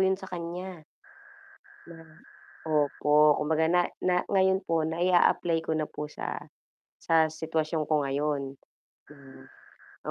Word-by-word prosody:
yung 190 0 +3
sa 190 0 -10
kanya 175 0 -6 1.1
na 170 - -11 0.7
opo, 150 0 +3
kumbaga 160 +1 +1
na 180 +1 +4 0.2
na 180 -1 +1
ngayon 190 -1 +3
po 165 -1 +1
nai-aapply 175 0 +2
ko - - -2
na 155 - -1
po 150 0 -6
sa, - - -5 0.7
sa 160 -1 +4
sitwasyon 160 0 -2
ko - - +3
ngayon 145 +1 -1 1.6
na - - -2
165 Hz, 120 wpm, -28 LUFS, 150-180 Hz, 1.6 s, na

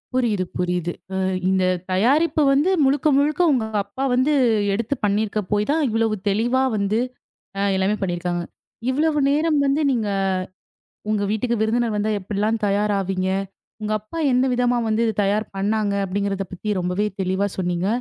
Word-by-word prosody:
புரியுது, 225 -7 +1
புரியுது. 180 -1 -1 0.2
அ - - -2 0.3
இந்த 190 -1 +2 0.3
தயாரிப்பு 280 - +2
வந்து 290 +7 +3 0.2
முழுக்க 275 +2 +2
முழுக்க 295 +4 +2
உங்க 250 -5 +1 0.2
அப்பா 200 +7 -6
வந்து 255 +4 +2 0.4
எடுத்து 230 +6 -1
பண்ணிருக்க 210 +1 0
போய் 210 0 +1
தான் 315 +1 +1
இவ்வளவு 225 -1 +1
தெளிவா 240 +6 +1
வந்து 205 +2 0 0.6
அ - - 0
எல்லாமே 190 +2 +1
பண்ணிருக்காங்க. 175 -1 -2 0.5
இவ்வளவு 300 +3 +1
நேரம் 305 +1 +2
வந்து 280 +3 +1
நீங்க 230 -5 0 1.0
உங்க 210 -1 +1
வீட்டுக்கு 235 +2 0
விருந்தினர் 225 0 +1
வந்தா, 210 +1 0
எப்படிலாம் 210 +3 -1
தயார் 205 +1 +1
ஆவீங்க. 190 -1 -2 0.5
உங்க 215 0 -2
அப்பா 215 +11 -8
எந்த 250 +1 +3
விதமா 245 0 +1
வந்து 220 +1 +1
இத 220 - -1
தயார் 210 +2 0
பண்ணாங்க 205 +1 0
அப்படிங்கிறத 195 0 -2
பத்தி 205 +2 -2
ரொம்பவே 180 +4 -1 0.2
தெளிவா 190 +2 0
சொன்னீங்க. 180 0 -1
215 Hz, 150 wpm, -22 LUFS, 195-250 Hz, 1.0 s, வந்து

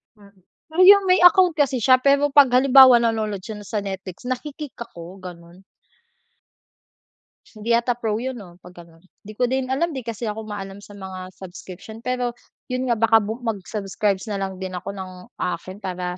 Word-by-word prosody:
Mm. 200 -2 -21 0.3
Ah 320 - -4
'Yung 400 +1 +8
may 365 0 +4
account 355 -1 +6
kasi 280 -4 +1
siya 255 +2 +6
pero 280 +2 +3
'pag 275 -2 +6
halimbawa 260 -1 +7
nanonood 220 -3 -1
siya 215 +3 -7
na 205 - -12
sa 215 - -2
Netflix, 190 -2 -7
naki-kick 285 +3 -6
ako, 175 -6 -9
ganon. 175 0 -12 1.8
Hindi 215 +1 -9
yata 235 +1 +1
pro 225 -3 -3
'yun 255 +2 -4
'no 180 -5 -13
'pag 180 - -13
ganon. 165 0 -20 0.2
Hindi 215 - -11
ko 250 - +2
din 260 +1 -2
alam, 320 +5 -1
'di 265 - -5
kasi 230 0 -5
ako 215 0 -4
maalam 200 -1 -7
sa 205 0 -14
mga 185 -1 -8
subscription 190 +4 -11
pero 250 0 -2 0.4
'yun 255 +1 -2
nga, 235 - +3
baka 225 0 +4
bu 215 +2 -4
mag-subscribes 200 -1 -2
na 200 - -3
lang 190 -1 -4
din 185 0 -6
ako 180 +2 -6
ng 190 -1 -7 0.3
akin 185 +2 -4
para 180 -1 -4
215 Hz, 180 wpm, -22 LUFS, 190-255 Hz, 1.8 s, Yung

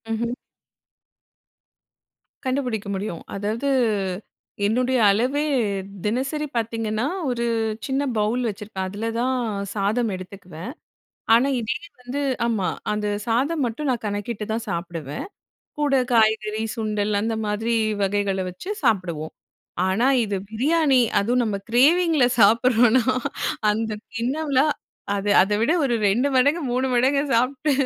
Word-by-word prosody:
ம்ஹ்ம். 235 +2 -2 2.1
கண்டுபிடிக்க 250 -6 -1
முடியும். 190 -3 -4
அதாவது 215 +7 -2 1.0
என்னுடைய 250 +4 +1
அளவே 255 +8 +1 0.6
தினசரி 270 +7 -1
பார்த்தீங்கன்னா, 225 +1 -1 0.2
ஒரு 235 -1 -1 0.4
சின்ன 270 +1 0
பவுல் 215 +4 +1
வச்சிருப்பேன். 200 -2 -5
அதில 210 +4 -3
தான் 260 +2 +1 0.4
சாதம் 215 +4 +1
எடுத்துக்குவேன். 185 +1 -9 0.6
ஆனா 240 +4 +5
இதே 230 +2 -2 0.3
வந்து 250 +3 -4 0.2
ஆமா. 210 -7 0 0.2
அந்த 210 0 -1 0.2
சாதம் 275 +7 +1
மட்டும் 250 +5 -3
நான் 240 -3 -3
கணக்கிட்டு 205 +1 -3
தான் 225 +1 -3
சாப்பிடுவேன். 170 - -4 0.5
கூட 285 -2 +3 0.2
காய்கறி 220 -1 +2
சுண்டல் 210 -2 -1
அந்த 225 +2 -1
மாதிரி 220 +3 -1 0.3
வகைகள 195 -1 0
வச்சு 180 - -8
சாப்பிடுவோம். 180 -9 0 0.6
ஆனா, 210 +7 +2 0.2
இது 205 -3 -1
பிரியாணி 275 +4 +3 0.2
அதுவும் 245 +5 +2
நம்ம 210 -3 -1
கிரேவிங்கில 305 +5 +4 0.2
சாப்பிட்றோன்னா, 235 +3 +5 0.7
அந்த 220 +1 -1 0.2
கிண்ணம்லாம் 275 +4 +1 0.4
அது 200 +1 -1
அதை 200 +2 0
விட 235 +8 +3
ஒரு 250 -3 +1
2 240 +8 +2
மடங்கு 285 +6 +3
3 255 +2 +1
மடங்கு 265 +3 +3
சாப்பிட்டு 255 +5 +1
230 Hz, 115 wpm, -23 LUFS, 210-260 Hz, 2.1 s, ஆனா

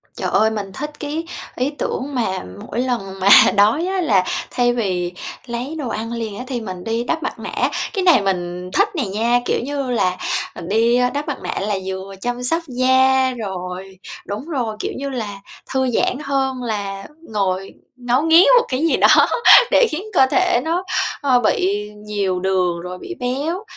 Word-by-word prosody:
Trời - - -2
ơi, 220 - +3
mình 205 -3 -4
thích 295 +6 -5
cái 305 +3 -4 0.3
ý 255 +3 0
tưởng 280 +1 -3
mà 220 -6 -1 0.2
mỗi - - -4
lần 230 -7 -2
mà 190 +1 +3 0.3
đói 215 +11 +3
á 380 0 -1
là 200 - +3 0.3
thay 245 -1 +2
vì 185 -6 -2 0.3
lấy 245 +5 -5
đồ 265 -5 -3
ăn 225 +1 -4
liền 225 -3 -4
á 250 - -5
thì 250 -3 -3
mình 185 -4 -7
đi 225 +3 -1
đắp 325 +6 -2
mặt - - -4
nạ, - - -1 0.2
cái 390 -4 -1
này 350 - +6
mình 180 -2 -3
thích 405 +2 +3
này 280 -10 -1
nha, 230 +5 +1
kiểu - - 0
như 275 -1 -3
là, 185 -6 +1 0.4
à, - - -9
đi 230 +4 +3
đắp 290 +2 -3
mặt 290 - -3
nạ - - -3
là 205 +1 -1
vừa 190 +1 -6
chăm 245 +2 -3
sóc 330 +7 0
da, 260 0 +3
rồi 190 -2 -6 0.3
đúng 205 +7 -5
rồi, 250 -9 -3
kiểu - - -3
như 275 +1 -4
là, 215 -7 -5 0.3
thư 260 -1 +1
giãn 245 - +1
hơn 265 -2 -1
là 200 -4 -4 0.2
ngồi 195 -3 -2 0.2
ngấu 245 +1 0
nghiến 325 +3 +6
một 475 - -2
cái 255 - -1
gì - - +2
đó - - +6 0.4
để 485 - +5
khiến 315 +5 -3
cơ 265 - +6
thể 365 -1 +2
nó, 335 +3 -1 0.4
ơ, 265 -4 +3
bị 210 -2 0 0.2
nhiều 200 -3 -1
đường, 180 -2 0
rồi 180 +1 -7
bị 355 - -8
béo. 285 - -2
240 Hz, 190 wpm, -20 LUFS, 195-270 Hz, 0.4 s, này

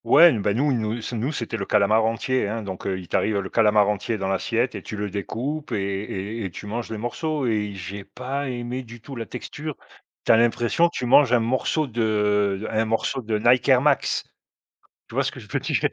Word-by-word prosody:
Ouais 170 +3 +8
n 115 -9 0
bah, 100 +1 +1
nous, 140 +3 +2
nous 110 -1 -1
c 120 +2 -5
nous 120 +6 -1
c'était 115 -5 -3
le 100 - -3
calamar 105 +2 +4
entier, 115 +1 0
hein. 110 +2 -3
Donc, 95 -2 -6
heu, 95 -1 -1
il 90 - -10
t'arrive 105 +4 +1
le 95 -1 -3
calamar 105 -2 +4
entier 105 +2 -1
dans 95 -1 -2
l'assiette 115 +6 0
et - - -6
tu - - -7
le 105 -1 -3
découpes 130 - -4
et - - +1
et 100 +2 -3
et - - -3
tu 90 - -9
manges 115 +3 -4
les 110 - -4
morceaux 145 +6 -2
et 110 -3 +1
i 100 - -8
j'ai 95 +2 -6
pas 135 +5 -4
aimé 120 +1 -4
du 120 -1 -11
tout 135 +4 -10
la 115 -2 -5
texture. 150 +4 -6 0.5
Tu - - +5
as 115 - +7
l'impression 120 +8 +3
que - - -8
tu 125 - -2
manges 125 +1 +5
un 125 - +6
morceau 130 +6 0
de 105 -4 +1
d 110 - -4
un 110 +1 +1
morceau 115 +4 -1
de 110 -2 -1
Nike 120 +4 +3
Air 130 -2 +6
Max. 145 -2 +2 0.9
Tu - - -11
vois - - +2
ce - - 0
que - - -10
je - - -14
veux - - 0
dire? - - 0
115 Hz, 240 wpm, -24 LUFS, 105-125 Hz, 0.9 s, Ouais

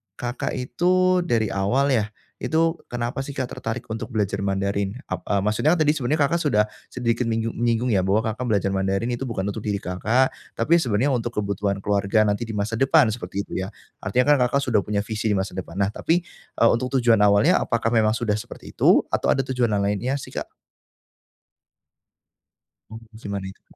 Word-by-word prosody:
Kakak 120 +1 -3
itu, 180 +8 +2
dari 110 -6 +1
awal 120 +9 +1
ya, 110 -5 +2 0.3
itu 165 +1 +1
kenapa 120 +1 -3
sih 135 +1 -5
Kak 130 -2 -3
tertarik 115 +2 -4
untuk 110 0 -4
belajar 105 -2 0
Mandarin 100 +1 -1 0.2
ap - - -1
a 100 -2 +1
maksudnya 110 - +2
kan - - -4
tadi 150 - +4
sebenarnya 150 +1 0
Kakak 165 +5 +1
sudah, 140 -10 +3 0.2
sedikit 120 -1 -1
minyu 115 0 -1
nyinggung 120 +1 0
ya 100 - +3
bahwa 95 +4 +1
Kakak 120 +3 -5
belajar 100 -3 +1
Mandarin 95 +4 0
itu 120 +2 -3
bukan 110 -5 -3
untuk 100 +3 -3
diri 105 -1 -2
Kakak, 105 +7 +1 0.2
tapi 165 +9 +3
sebenarnya 125 -1 +1
untuk 120 -2 -2
kebutuhan 100 -1 -2
keluarga 100 +1 +2
nanti 105 +2 -1
di 110 - -5
masa 105 +2 -2
depan, 135 -3 +4
seperti 100 -2 -4
itu - - -5
ya? 95 - -3 0.3
Artinya 110 +7 +1
kan - - +1
Kakak 140 +3 0
sudah 115 -5 +2
punya 100 0 -1
visi 110 +1 -3
di 105 - +2
masa 95 +1 -1
depan. 90 -2 -7
Nah 100 +1 +1
tapi, 165 +9 0 0.3
e - - +1
untuk 125 +3 -1
tujuan 120 -4 +4
awalnya 105 0 +4
apakah 115 -1 0
memang 110 -2 +3
sudah 110 -3 -1
seperti - - -10
itu, - - +4
atau - - 0
ada 135 - +2
tujuan 125 -2 0
yang 105 -2 0
lainnya 105 +7 0
sih 140 - -7
Kak? - - -4 2.4
Oh, 110 +1 -9 0.2
cuman 100 -2 -4
itu. 95 - -15
115 Hz, 190 wpm, -23 LUFS, 100-125 Hz, 2.4 s, tadi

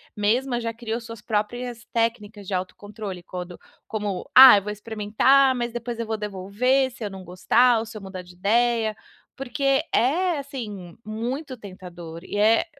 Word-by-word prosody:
mesma 240 +4 0
já 230 0 -3
criou 230 0 -4
suas 230 -1 -10
próprias 235 +2 -3
técnicas 220 -3 -2
de 195 - -4
autocontrole 195 +1 -5
quando 180 0 -8 0.3
como 205 -4 -4
"Ah, 260 -4 +11
eu - - 0
vou 210 - -4
experimentar, 220 +6 +3
mas 240 -1 -3
depois 240 0 -5
eu 230 - -3
vou 220 - -1
devolver 210 +7 0
se 235 - -10
eu 210 - -3
não 190 -1 -10
gostar 225 +7 +3
ou 225 - -4
se 220 0 -9
eu - - -9
mudar 190 -1 -7
de 180 0 -15
ideia", 220 +3 +1 0.4
porque 270 +2 0
é, 330 +6 +2
assim, 215 - -7
muito 250 +6 -4
tentador 180 -5 -10
e 205 - -5
é 220 +6 +4
220 Hz, 170 wpm, -24 LUFS, 200-245 Hz, 0.4 s, Ah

